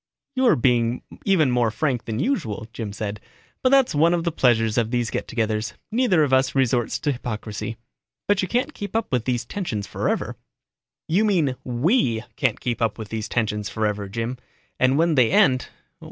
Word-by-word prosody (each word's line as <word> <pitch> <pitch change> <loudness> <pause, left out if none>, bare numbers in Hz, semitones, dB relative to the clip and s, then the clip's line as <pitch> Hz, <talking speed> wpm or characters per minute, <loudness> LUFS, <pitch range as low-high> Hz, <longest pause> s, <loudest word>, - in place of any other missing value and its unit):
"You're 260 -2 +4
being 120 -1 +1 0.2
even 165 -9 +3
more 120 -2 +2
frank 125 +2 -1
than 110 -1 -3
usual," 120 - -1
Jim 110 -2 -5
said. 105 0 -4 0.4
"But 255 - +3
that's 270 -1 +4
one 165 +4 +4
of 170 - -2
the 170 - 0
pleasures 115 -7 +2
of 115 -2 0
these 120 -2 -1
get - - -3
togethers, 110 -2 -1 0.2
neither 215 -9 +3
of 135 -3 0
us 130 0 +3
resorts 125 -3 +1
to 145 - +1
hypocrisy. 110 -3 -5 0.5
But 205 -1 +3
you 185 - -1
can't 250 - 0
keep 205 0 -7
up 225 -1 -1
these 120 -2 -1
tensions 120 - -3
forever." - - -2 0.7
"You 185 +7 +2
mean 170 -11 +2
we 125 - +1
can't 130 -6 0
keep 120 -2 -3
up 115 -2 0
these 110 0 -4
tensions 105 -3 -1
forever, 105 -2 -2
Jim. 115 +4 -3 0.4
And 130 +2 +3
when 165 +1 +3
they 125 -6 +4
end? 130 +1 +3
125 Hz, 175 wpm, -23 LUFS, 110-165 Hz, 0.7 s, You're